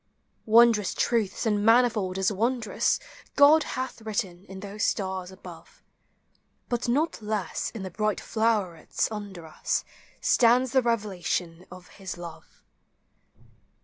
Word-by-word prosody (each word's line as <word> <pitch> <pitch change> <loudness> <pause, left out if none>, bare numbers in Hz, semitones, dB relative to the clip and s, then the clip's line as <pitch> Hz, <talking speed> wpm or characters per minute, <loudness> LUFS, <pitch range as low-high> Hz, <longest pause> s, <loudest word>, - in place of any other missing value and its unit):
Wondrous 225 -2 +5
truths, 225 -2 0
and 210 -2 +1
manifold 225 -5 +3
as 190 +1 +1
wondrous, 225 +2 0 0.4
God 295 +3 +7 0.2
hath 260 -2 -4
written 200 -4 -4
in 190 -1 -10
those 205 +2 -5
stars 190 -3 -1
above; 190 0 -13 0.9
But 240 0 -1
not 290 +2 0
less 210 -2 -2
in 220 -4 -8
the 190 - -6
bright 215 +3 -1
flowerets 210 -7 0
under 200 -5 -7
us 155 - -2 0.3
Stands 245 +2 +4
the 260 -1 +4
revelation 185 -6 -2
of 180 0 -12
his 185 -2 -6
love. 170 -2 -11
210 Hz, 120 wpm, -26 LUFS, 190-235 Hz, 0.9 s, God